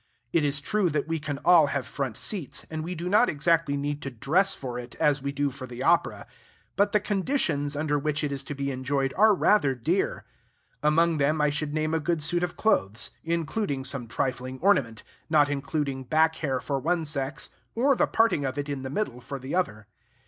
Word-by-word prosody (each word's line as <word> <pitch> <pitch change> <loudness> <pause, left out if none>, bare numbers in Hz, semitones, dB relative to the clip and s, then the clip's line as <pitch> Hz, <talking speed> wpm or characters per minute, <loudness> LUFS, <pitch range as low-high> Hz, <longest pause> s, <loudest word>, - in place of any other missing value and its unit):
It 165 - +3
is 145 0 +1
true 195 +5 +1
that 150 -1 -1
we 165 0 -1
can 145 -1 -4
all 170 -4 +7
have 140 -2 -2
front 135 -5 -4
seats, 185 - -3
and 155 0 -3
we 180 +3 -4
do 170 +2 -4
not 210 +6 +4
exactly 155 -1 +1
need 145 +1 -3
to 135 - -4
dress 165 - +1
for 125 -2 -5
it 120 0 -9
as 145 -2 +2
we 140 +1 -2
do 140 0 -1
for 130 0 -8
the 125 +1 -6
opera; 170 +2 +2 0.5
but 200 +1 +2
the 210 - +4
conditions 190 - 0
under 145 0 0
which 150 +1 -1
it 145 - -1
is 140 -1 -3
to 145 - -5
be 140 0 -2
enjoyed 135 +1 -1
are 215 +2 +5
rather 160 -9 +3
dear. 160 +11 -1 0.6
Among 160 +2 +3
them 150 +3 +2
I 150 -1 +3
should 150 0 -3
name 155 0 0
a 160 - +2
good 160 0 0
suit 175 +3 0
of 180 -2 -3
clothes, 110 - +1
including 165 -3 -2
some 130 -3 -4
trifling 130 +2 -3
ornament, 140 - +2 0.3
not 150 -2 +4
including 140 -1 -2
back 160 +4 +2
hair 135 -4 -1
for 140 +2 -2
one 165 +4 0
sex, 140 -1 -4 0.3
or 270 +4 +3
the - - +2
parting 225 -10 +2
of 135 0 -3
it 145 0 -3
in 140 -2 -3
the 130 - -5
middle 135 - -3
for 140 - -6
the 130 +1 -7
other. 110 -13 -1
145 Hz, 210 wpm, -27 LUFS, 135-170 Hz, 0.6 s, all